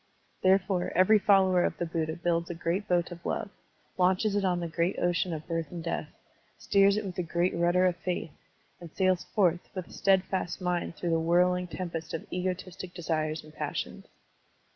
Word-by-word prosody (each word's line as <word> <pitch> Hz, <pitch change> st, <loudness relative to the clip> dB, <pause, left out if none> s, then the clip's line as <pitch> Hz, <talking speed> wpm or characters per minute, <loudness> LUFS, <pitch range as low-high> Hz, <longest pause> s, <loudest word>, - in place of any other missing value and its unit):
Therefore, 190 Hz, -1 st, +2 dB
every 185 Hz, +4 st, +6 dB
follower 190 Hz, -3 st, +4 dB
of -, -, -1 dB
the 175 Hz, -, -1 dB
Buddha 160 Hz, -1 st, -2 dB
builds 170 Hz, -1 st, -1 dB
a 175 Hz, -, -4 dB
great 175 Hz, +4 st, -2 dB
boat 175 Hz, 0 st, +1 dB
of 170 Hz, 0 st, -9 dB
love, 200 Hz, -, -3 dB, 0.5 s
latmches 190 Hz, +3 st, +3 dB
it 205 Hz, -, +1 dB
on 180 Hz, -2 st, +1 dB
the 170 Hz, -, -3 dB
great 170 Hz, +2 st, -1 dB
ocean 175 Hz, +1 st, +1 dB
of 155 Hz, -1 st, -5 dB
birth 165 Hz, -3 st, -2 dB
and 170 Hz, -2 st, -6 dB
death, 170 Hz, -, -3 dB, 0.5 s
steers 200 Hz, 0 st, +4 dB
it 215 Hz, -, -2 dB
with 190 Hz, -, -4 dB
the 180 Hz, -, -2 dB
great 175 Hz, +1 st, 0 dB
rudder 175 Hz, +2 st, +3 dB
of 180 Hz, -1 st, +1 dB
faith, 175 Hz, -2 st, -3 dB, 0.5 s
and 170 Hz, -2 st, -10 dB
sails 185 Hz, 0 st, +1 dB
forth 180 Hz, -4 st, +2 dB
with 185 Hz, -2 st, -4 dB
a -, -, -15 dB
steadfast 190 Hz, -2 st, +1 dB
mind 180 Hz, -2 st, -2 dB
through 175 Hz, -, -2 dB
the 165 Hz, -, +2 dB
whirling 180 Hz, +2 st, +2 dB
tem 175 Hz, 0 st, -5 dB
pest 165 Hz, -1 st, -4 dB
of 165 Hz, -, -6 dB
egotistic 185 Hz, 0 st, -4 dB
desires 155 Hz, -2 st, -2 dB
and 155 Hz, 0 st, -15 dB
passions. -, -, -4 dB
175 Hz, 190 wpm, -29 LUFS, 170-185 Hz, 0.5 s, every